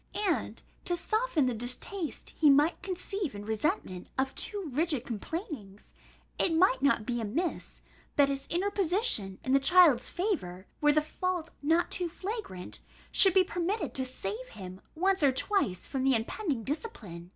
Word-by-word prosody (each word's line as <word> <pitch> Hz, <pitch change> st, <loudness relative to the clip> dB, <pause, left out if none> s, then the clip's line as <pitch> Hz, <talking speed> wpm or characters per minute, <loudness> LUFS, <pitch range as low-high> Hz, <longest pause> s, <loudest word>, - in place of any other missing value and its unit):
And, 360 Hz, -, -1 dB, 0.2 s
to 350 Hz, -, +1 dB
soften 430 Hz, -, +1 dB
the 250 Hz, -, 0 dB
distaste 250 Hz, -, -1 dB
he 305 Hz, -, +4 dB
might 295 Hz, +5 st, +4 dB
conceive 380 Hz, -, -4 dB
in 205 Hz, 0 st, -7 dB
resentment 220 Hz, -, -2 dB
of 265 Hz, 0 st, 0 dB
too 405 Hz, -4 st, +1 dB
rigid 295 Hz, -3 st, 0 dB
complainings, 230 Hz, -, -6 dB, 0.5 s
it 330 Hz, -, +2 dB
might 325 Hz, -6 st, +4 dB
not 275 Hz, -6 st, +2 dB
be 240 Hz, -1 st, -2 dB
amiss, 300 Hz, -, -3 dB, 0.3 s
that 285 Hz, -1 st, +5 dB
his 275 Hz, 0 st, -3 dB
interposition 365 Hz, -, 0 dB
in 260 Hz, -, -2 dB
the 275 Hz, -, +6 dB
child's 325 Hz, -3 st, +5 dB
favour, 195 Hz, -, -3 dB, 0.2 s
were 295 Hz, 0 st, +5 dB
the 305 Hz, +1 st, +2 dB
fault 350 Hz, +1 st, -3 dB
not 325 Hz, +4 st, +2 dB
too 355 Hz, -2 st, -2 dB
flagrant, 370 Hz, -, -6 dB, 0.3 s
should 385 Hz, -2 st, +7 dB
be 380 Hz, -, +7 dB
permitted 360 Hz, +4 st, -2 dB
to 260 Hz, -, -1 dB
save 255 Hz, -1 st, -5 dB
him 190 Hz, -4 st, -10 dB
once 380 Hz, +3 st, +1 dB
or 280 Hz, -2 st, +5 dB
twice 260 Hz, -, 0 dB
from 265 Hz, -2 st, -3 dB
the 270 Hz, -1 st, +4 dB
impending 255 Hz, -, -2 dB
discipline. 210 Hz, -, -6 dB
300 Hz, 155 wpm, -30 LUFS, 235-365 Hz, 0.5 s, should